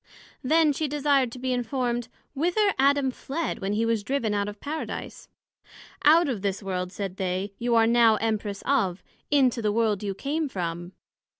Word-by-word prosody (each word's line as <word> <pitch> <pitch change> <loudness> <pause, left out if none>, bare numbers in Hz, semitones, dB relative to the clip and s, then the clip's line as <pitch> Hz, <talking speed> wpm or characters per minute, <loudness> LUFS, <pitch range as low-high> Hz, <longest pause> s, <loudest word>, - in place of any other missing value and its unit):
Then 310 +2 +4
she 310 +2 -1
desired 285 -3 +1
to 255 - -9
be 255 0 -1
informed, 245 -1 -1 0.3
whither 355 +8 +2
Adam 275 -1 +3
fled 300 +6 -4
when 195 +1 -2
he 220 +2 +1
was 230 -2 0
driven 235 -3 -1
out 205 0 0
of 205 - -6
the - - -37
Paradise? 310 +2 -6 0.7
Out 325 +3 +6
of 240 -8 -2
this 200 +1 -2
World, 180 -1 -3
said 195 -1 -5
they, 190 +2 -2
you 240 0 +1
are 225 -1 +5
now 230 -1 +5
Empress 215 -2 -2
of, 195 -10 +1 0.3
into 260 -5 +3
the 210 -1 +1
World 215 -2 +1
you 200 -2 -3
came 290 +6 -2
from. 175 -3 -4
235 Hz, 180 wpm, -26 LUFS, 200-280 Hz, 0.7 s, Out